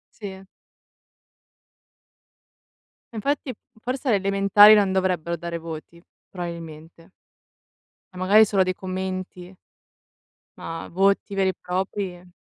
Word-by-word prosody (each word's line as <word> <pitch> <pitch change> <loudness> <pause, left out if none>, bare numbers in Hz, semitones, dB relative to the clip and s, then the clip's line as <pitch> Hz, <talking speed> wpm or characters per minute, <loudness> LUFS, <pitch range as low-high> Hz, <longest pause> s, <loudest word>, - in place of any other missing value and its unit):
Sì. 195 -3 -8 2.7
Infatti 270 +4 -2 0.3
forse 255 +4 -4
alle 225 -6 +3
elementari 200 +2 +6
non 200 -3 +3
dovrebbero 180 -3 0
dare 170 0 -5
voti, 165 +1 -9 0.3
probabilmente. 165 -2 -9 1.0
E - - -14
magari 200 +4 +5
solo 195 -3 +2
dei 185 0 -1
commenti. 185 -1 -6 1.0
Ma 165 0 -7
voti 195 +2 +1
veri 195 -1 +1
e - - -6
propri 180 -1 -4
190 Hz, 95 wpm, -23 LUFS, 175-200 Hz, 2.7 s, elementari